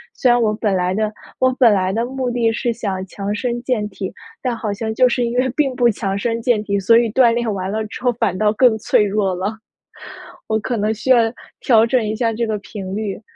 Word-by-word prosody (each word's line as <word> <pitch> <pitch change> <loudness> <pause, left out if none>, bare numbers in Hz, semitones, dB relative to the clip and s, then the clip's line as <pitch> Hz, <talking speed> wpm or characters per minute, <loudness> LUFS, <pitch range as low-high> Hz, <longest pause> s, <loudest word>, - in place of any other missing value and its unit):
虽 250 - +3
然 240 0 +3
我 215 -2 +2
本 210 -1 -1
来 180 0 0
的 215 +1 -1 0.3
我 255 0 +3
本 235 -5 +6
来 190 -1 +1
的 225 +4 -1
目 260 0 -3
的 235 -2 +1
是 240 +1 -1
想 195 -5 -4
强 200 +2 -4
身 240 +2 -2
健 240 -5 -1
体， 190 -1 -6 0.3
但 245 -3 -2
好 215 -2 -3
像 220 +2 -4
就 255 +2 +4
是 245 0 0
因 235 +1 -3
为 255 +1 +2
并 275 -4 +1
不 245 -1 +3
强 195 -2 -2
身 230 +3 -2
健 225 -3 +1
体， 200 -1 -1
所 230 +4 +5
以 235 -2 +2
锻 240 0 +4
炼 235 -2 -1
完 190 -1 -3
了 220 +2 -2
之 210 - -9
后 250 -1 +2
反 220 -6 -1
倒 210 +1 +2
更 235 0 +4
脆 210 - +2
弱 200 -2 0
了。 200 +5 -3 0.9
我 220 - +1
可 235 +2 -3
能 215 +1 0
需 220 +4 -6
要 255 - +7 0.4
调 225 -3 +4
整 250 +1 +1
一 215 0 -2
下 230 0 0
这 230 +1 -2
个 215 -1 -1
频 195 -2 -7
率。 210 -1 -4
220 Hz, 260 characters per minute, -19 LUFS, 205-240 Hz, 0.9 s, 要